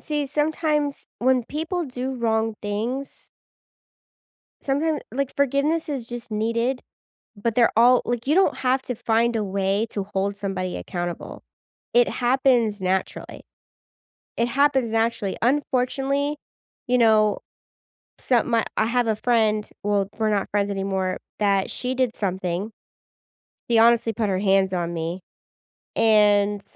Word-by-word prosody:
see, 295 -2 -2
sometimes 300 0 -1
when 255 -1 +2
people 325 +6 -3
do 255 0 -4
wrong 225 -2 0
things 230 +7 -4 1.3
sometim 295 +2 0
like 275 +1 -2
forgiveness 280 +4 +1
is 265 -6 -4
just 240 -1 -7
needed, 230 +4 -1 0.5
but 220 +2 -2
they're 235 -2 +4
all 245 +3 +6
like 240 -1 -2
you 300 - +3
don't 380 +1 +3
have 260 +1 +1
to 250 - -4
find 230 +1 +1
a 220 - 0
way 195 +2 0
to 200 - -3
hold 195 +1 -1
somebody 190 -2 -3
accountable. 175 -2 -5 0.5
It 240 0 +4
happens 245 -5 +2
naturally. 185 0 -3 0.9
It 235 - +2
happens 270 -1 +2
naturally. 225 -3 -1
Unfortunately, 275 +2 0 0.5
you 250 - +3
know, 215 -3 +4 0.8
some 245 -2 +1
my 230 -2 +2
I 220 - +3
have 240 +1 +1
a 220 - +1
friend, 215 -2 +1 0.2
well, 205 -1 0
we're 220 -1 +1
not 205 -2 0
friends 205 0 0
anymore, 195 -1 -2 0.2
that 200 -2 +2
she 255 +1 -3
did 255 -3 0
something. 190 +1 -2 1.0
She 235 - +4
honestly 230 0 +4
put 215 -1 -1
her 185 -1 0
hands 195 -1 +2
on 175 -1 -2
me. 170 +2 -4 0.7
And 210 -2 +3
230 Hz, 135 wpm, -23 LUFS, 205-260 Hz, 1.3 s, all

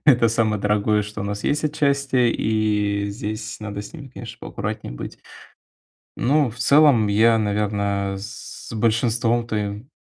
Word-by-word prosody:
это 125 -5 +6
самое 110 -2 +1
дорогое, 105 +1 +2
что 105 0 -7
у - - -2
нас 100 0 -4
есть 150 +2 +1
отчасти. 140 -3 +1 0.2
И 105 -2 0
здесь 110 +2 -5
надо 100 -1 -5
с - - -11
ними, 145 -5 -9
конечно, 120 -2 -9
поаккуратнее 105 - -5
быть. - - -7 1.0
Ну 140 +1 +2
в 115 - -13
целом 140 -5 +5
я, 115 +3 +4
наверно, 100 -2 0
с 110 +3 -9
большинством 115 +1 +1
твоим 105 +2 -3
110 Hz, 145 wpm, -22 LUFS, 105-120 Hz, 1.0 s, это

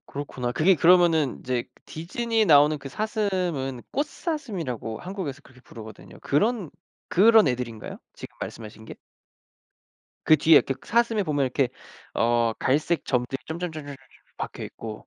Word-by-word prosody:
그렇구나. 130 -3 -5
그게 180 +8 +4
그러면은 165 -4 +4
이제 125 -1 -2 0.2
디즈니에 225 +7 -1
나오는 150 -2 +5
그 135 0 -8
사슴은 180 - -2
꽃사슴이라고 215 - -4
한국에서 180 -7 -6
그렇게 125 -2 -19
부르거든요. 110 -5 -12
그런 205 - 0 0.4
그런 215 -1 +6
애들인가요? 120 -3 -4 0.2
지금 - - -11
말씀하신 110 -1 -8
게? - - -9 1.3
그 155 - +6
뒤에 160 +2 +6
이렇게 135 - +3
사슴에 230 -2 +1
보면 145 -6 0
이렇게 130 0 0 0.5
어 115 0 +2
갈색 150 +3 0
점들이 125 +1 -1
점점점점점점점 160 -4 -6 0.4
박혀있고 110 -2 -7
150 Hz, 350 characters per minute, -25 LUFS, 125-190 Hz, 1.3 s, 그런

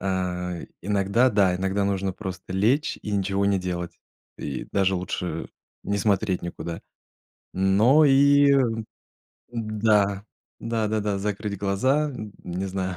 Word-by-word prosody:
А, 90 -2 -2 0.2
иногда, 105 +5 +2
да, 100 -3 +3
иногда 95 +2 0
нужно 95 -1 -1
просто 95 -1 -7
лечь 115 +11 +1
и - - -5
ничего 100 0 0
не 100 -1 +2
делать. 90 -1 -4 0.4
И 70 -3 -5
даже 95 -1 +2
лучше 90 -2 -4 0.4
не 100 0 -1
смотреть 100 -2 +1
никуда. 85 -1 -6 0.7
Но 105 +11 +4
и 140 0 +5 1.0
да, 105 -3 +1 0.4
да-да-да, 110 -3 -1
закрыть 105 0 -3
глаза, 130 +10 +1 0.3
не 90 +2 -4
знаю, 95 -1 -3
100 Hz, 115 wpm, -25 LUFS, 95-110 Hz, 1.0 s, и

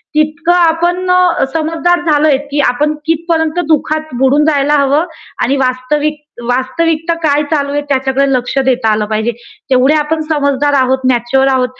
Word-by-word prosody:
तितक 310 +2 0
आपण 350 +1 +2
अ, 360 -1 +2
समजदार 330 +2 0
झालोय 295 -2 +3
की 290 - -1
आपण 295 +5 0
कितीपर्यंत 325 0 -1
दुःखात 310 -1 -1
बुडून 280 +3 +3
जायला 290 -1 +1
हवं 285 +4 +2 0.4
आणि 275 +2 +1
वास्तविक 290 +4 -1 0.2
वास्तविकता 325 +6 0
काय 295 0 +2
चालू 285 -2 0
आहे 290 0 -1
त्याच्याकडे 265 0 +1
लक्ष 250 +2 -2
देता 245 -4 +1
आल 210 0 0
पाहिजे. 220 +2 -1 0.4
तेवढे 260 +3 +3
आपण 310 +1 -1
समजदार 285 -1 0
आहोत, 260 -1 +2
मॅच्युअर 250 +3 +1
आहोत. 255 0 -3
295 Hz, 150 wpm, -13 LUFS, 265-320 Hz, 0.4 s, झालोय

